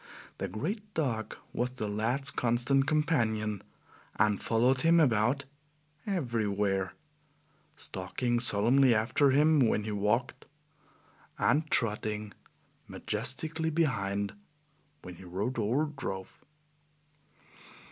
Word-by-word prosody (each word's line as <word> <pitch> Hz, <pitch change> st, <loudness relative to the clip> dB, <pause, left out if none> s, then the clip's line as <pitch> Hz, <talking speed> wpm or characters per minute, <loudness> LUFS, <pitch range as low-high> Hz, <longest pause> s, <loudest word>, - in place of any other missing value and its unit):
The -, -, -2 dB
great 155 Hz, -, -3 dB
dog 120 Hz, -8 st, -2 dB, 0.2 s
was 125 Hz, +1 st, -1 dB
the 110 Hz, -5 st, -4 dB
lad's 115 Hz, +7 st, +2 dB
constant 125 Hz, +3 st, +1 dB
companion, 110 Hz, -, 0 dB, 0.5 s
and 105 Hz, 0 st, +2 dB
followed 125 Hz, +3 st, +2 dB
him 165 Hz, +1 st, +5 dB
about 130 Hz, 0 st, +2 dB, 0.6 s
everywhere, 105 Hz, -, -1 dB, 0.8 s
stalking 120 Hz, +6 st, -2 dB
solemnly 120 Hz, +3 st, +4 dB
after 120 Hz, +6 st, +2 dB
him 150 Hz, +3 st, +4 dB
when 110 Hz, -4 st, +2 dB
he 110 Hz, -, -4 dB
walked, 105 Hz, +4 st, -1 dB, 0.9 s
and 155 Hz, +4 st, +1 dB
trotting 105 Hz, -2 st, -1 dB, 0.5 s
majestically 160 Hz, +4 st, -2 dB
behind 100 Hz, -11 st, -1 dB, 0.7 s
when 90 Hz, -1 st, -9 dB
he -, -, -12 dB
rode 100 Hz, +8 st, -3 dB
or 120 Hz, +8 st, +1 dB
drove. 95 Hz, -8 st, -6 dB
120 Hz, 95 wpm, -30 LUFS, 105-140 Hz, 0.9 s, him